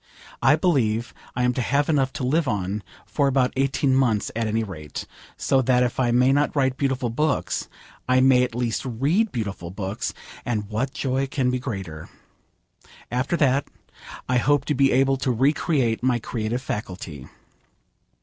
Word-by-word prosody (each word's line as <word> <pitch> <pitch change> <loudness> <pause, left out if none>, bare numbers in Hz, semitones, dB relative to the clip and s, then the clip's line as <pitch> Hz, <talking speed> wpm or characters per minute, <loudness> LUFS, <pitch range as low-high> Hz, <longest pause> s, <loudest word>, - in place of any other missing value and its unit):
I 135 +4 +5
believe 125 - +1 0.2
I 125 - 0
am 125 0 +2
to 125 - -1
have 140 +4 +1
enough 135 -4 +2
to - - -4
live 150 +4 +1
on 100 -2 -1 0.2
for 140 -2 +1
about 130 -2 +2
eighteen 135 0 +1
months 120 -6 +2
at 115 -1 0
any 110 +1 0
rate, 75 -8 -7 0.3
so 135 - +2
that 125 0 +3
if 125 0 -2
I 125 -2 +2
may 125 +3 +4
not 145 +2 +1
write 130 -2 +2
beautiful 135 -3 -1
books, 150 +5 -1 0.4
I 130 0 +5
may 130 -1 +5
at 125 -2 -1
least 120 -2 -1
read 145 - +1
beautiful 100 -7 -4
books; 95 +2 -4 0.3
and 105 -4 -2
what 125 +5 -1
joy 135 0 -1
can 130 -2 0
be 125 - -1
greater? 95 - -6 1.0
After 130 +7 0
that, 140 -2 +2 0.6
I 125 - +2
hope 145 +2 +2
to 150 - 0
be 135 0 +3
able 135 +1 +3
to 130 - -2
recreate 130 -1 +1
my 125 -1 +2
creative 115 +1 -3
faculty. 90 - -6
125 Hz, 170 wpm, -24 LUFS, 115-135 Hz, 1.0 s, I